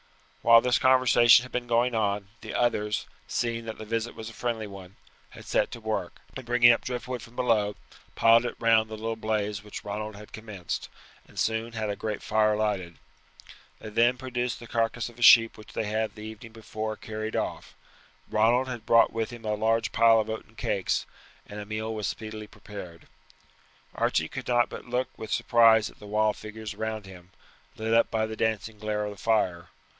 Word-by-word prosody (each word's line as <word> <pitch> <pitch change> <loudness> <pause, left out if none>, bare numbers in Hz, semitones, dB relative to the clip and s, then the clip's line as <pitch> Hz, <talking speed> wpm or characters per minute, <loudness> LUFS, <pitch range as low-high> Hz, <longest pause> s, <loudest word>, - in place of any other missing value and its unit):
While 115 0 +7
this 125 0 +2
conversation 125 -2 +6
had 130 - -11
been 125 -1 -3
going 120 +1 +2
on, 100 -3 -1
the - - -7
others, 105 -3 0 0.2
seeing 115 -1 -2
that 110 - -6
the 110 - -8
visit 115 +2 -3
was 110 - -7
a 115 - -8
friendly 115 -2 -3
one, 95 -2 -11 0.3
had - - -13
set - - +1
to - - -8
work, 110 -5 -3 0.2
and 130 - -6
bringing 120 0 +6
up 115 - +1
driftwood 125 -1 -4
from 120 +1 -14
below, 110 -5 +1 0.4
piled 115 +1 +5
it - - -5
round 110 -1 +3
the 110 - -6
little 115 +1 -3
blaze 105 -2 -2
which 105 - -9
Ronald 105 +1 -4
had 105 +1 -13
commenced, 105 -6 -6 0.4
and - - -19
soon 115 +1 -1
had 110 -2 -2
a - - -3
great 105 -1 -4
fire 110 0 +2
lighted. 100 -5 -2 0.8
They 110 - -9
then 120 +3 +3
produced 125 -1 -3
the 120 - -10
carcass 115 +1 -1
of 120 0 -17
a - - -10
sheep 115 -1 +8
which 110 - -14
they - - -1
had 110 0 -2
the 105 - -9
evening 110 +1 -9
before 110 -1 -5
carried 110 0 -5
off. - - -4 0.5
Ronald 120 +4 +3
had 120 -3 -7
brought 115 0 +5
with 115 -1 -2
him 120 -2 -10
a 105 - 0
large 110 +2 +1
pile 115 0 +5
of 110 0 -2
oaten 110 - -8
cakes, - - -1 0.4
and 105 - -8
a 105 - -6
meal 110 +1 -3
was 105 -2 -3
speedily 110 -1 -6
prepared. 95 -7 -11 0.9
Archie - - +1
could - - -7
not 120 -1 +3
but - - -8
look 125 +1 -1
with 110 - -8
surprise 115 -2 +4
at - - -23
the 105 - -11
wild 105 +1 +1
figures 110 -1 -7
around 110 -1 -4
him, 90 -2 -13 0.5
lit 110 +1 -1
up 115 - +4
by 110 -1 0
the 110 0 -6
dancing 110 -1 -2
glare 105 0 -2
of 105 - -4
the 100 - -11
fire. 90 -6 0
110 Hz, 200 wpm, -27 LUFS, 105-115 Hz, 0.9 s, sheep